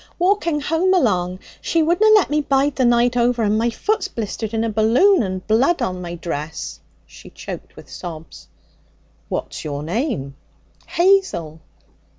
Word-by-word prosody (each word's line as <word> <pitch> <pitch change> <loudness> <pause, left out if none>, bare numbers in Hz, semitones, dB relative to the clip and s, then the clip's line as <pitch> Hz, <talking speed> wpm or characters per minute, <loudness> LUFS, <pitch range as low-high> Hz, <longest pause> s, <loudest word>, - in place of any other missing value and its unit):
'Walking 350 -4 +1
home 335 +6 +2
along. 185 - +1 0.2
She 330 -1 +1
wouldna 350 +7 +3
let 405 -7 +3
me 300 0 +2
bide 280 0 +1
the 260 - +2
night 240 0 +3
over. 240 -1 +2
And 210 0 +2
my 235 +1 +1
foot's 400 - -1
blistered 220 - -5
in 225 0 -1
a 230 - 0
balloon 240 - +4
and 185 -3 -4
blood 260 +10 +2
on 185 -7 -2
my 175 -1 -6
dress.' 160 -2 -5 0.3
She - - -14
choked - - -9
with - - -13
sobs. 165 -3 -9 0.8
'What's - - -4
your 145 -1 -4
name?' 175 - -3 0.5
'Hazel.' 340 - +1
235 Hz, 155 wpm, -20 LUFS, -, 0.8 s, balloon